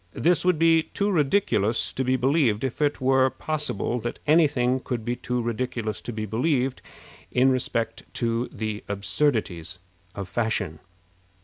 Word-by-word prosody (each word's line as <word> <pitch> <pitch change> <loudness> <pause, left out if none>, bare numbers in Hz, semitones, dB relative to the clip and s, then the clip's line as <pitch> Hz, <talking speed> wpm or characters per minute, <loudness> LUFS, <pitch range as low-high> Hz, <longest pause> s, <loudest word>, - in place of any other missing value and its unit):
This 175 +1 +2
would 180 -2 +3
be 165 0 +5
too 200 +5 -2
ridiculous 135 - +1
to 130 - -1
be 130 0 +2
believed 130 -4 +2
if 135 +2 -3
it 145 -1 +1
were 130 0 +4
possible 150 -6 -2
that 120 +1 -4
any 155 +1 +5
thing 130 -2 0
could 120 -3 -4
be 120 0 -1
too 125 -1 -2
ridiculous 115 -2 -3
to - - -5
be 110 -1 -4
believed 125 +4 0 0.5
in 130 +2 +4
respect 115 -3 -2
to 115 +1 -1
the 110 -1 -4
absurdities 100 - -1 0.4
of 100 -2 -5
fashion. 100 -7 -1
125 Hz, 150 wpm, -25 LUFS, 110-145 Hz, 0.5 s, be